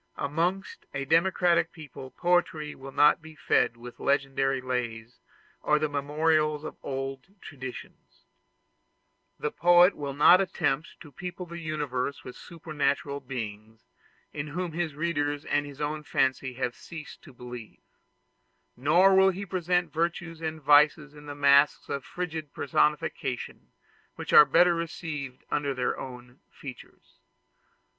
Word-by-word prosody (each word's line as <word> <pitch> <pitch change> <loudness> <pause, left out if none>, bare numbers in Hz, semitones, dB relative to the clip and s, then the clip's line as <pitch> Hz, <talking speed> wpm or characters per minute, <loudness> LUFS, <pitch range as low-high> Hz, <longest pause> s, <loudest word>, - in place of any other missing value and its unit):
Amongst 170 +7 -2
a 140 0 -2
democratic 170 +1 +3
people 145 -5 -10
poetry 170 -2 0
will 135 +1 -10
not 150 +3 +4
be 160 0 -13
fed 140 -4 +1
with 120 +1 -11
legendary 135 -1 +1
lays 125 -2 -4 0.4
or 150 - +3
the 155 0 0
memorials 150 +1 +1
of 155 - -6
old 135 +6 -5
traditions. 130 -7 -10 1.1
The 150 - -2
poet 175 +2 +5
will 140 -2 -5
not 175 +6 +7
attempt 160 -5 -2
to 150 - -12
people 180 +5 -7
the 170 0 -8
universe 145 -4 -3
with 125 - -9
supernatural 145 -4 -2
beings 110 -4 -7 0.5
in 145 0 -4
whom 175 +3 -4
his 165 -2 -3
readers 145 -2 -1
and 145 0 0
his 140 -1 -11
own 150 +1 -2
fancy 130 -3 0
have 125 -1 -2
ceased 160 +3 -10
to 145 - -14
believe; 125 -3 -10 0.9
nor 170 +9 +4
will 190 0 +6
he 190 +2 -4
present 180 -1 0
virtues 165 0 -2
and 160 -1 -3
vices 150 +1 +4
in 150 0 -13
the 145 - -6
mask 140 0 +4
of 140 -1 -3
frigid 160 -4 -5
personification, 140 -2 -1 0.5
which - - -6
are 150 - +10
better 175 +3 +5
received 160 -5 -5
under 145 -2 -1
their 125 -1 -1
own 125 0 -10
features. 130 -4 -12
150 Hz, 135 wpm, -27 LUFS, 135-165 Hz, 1.1 s, are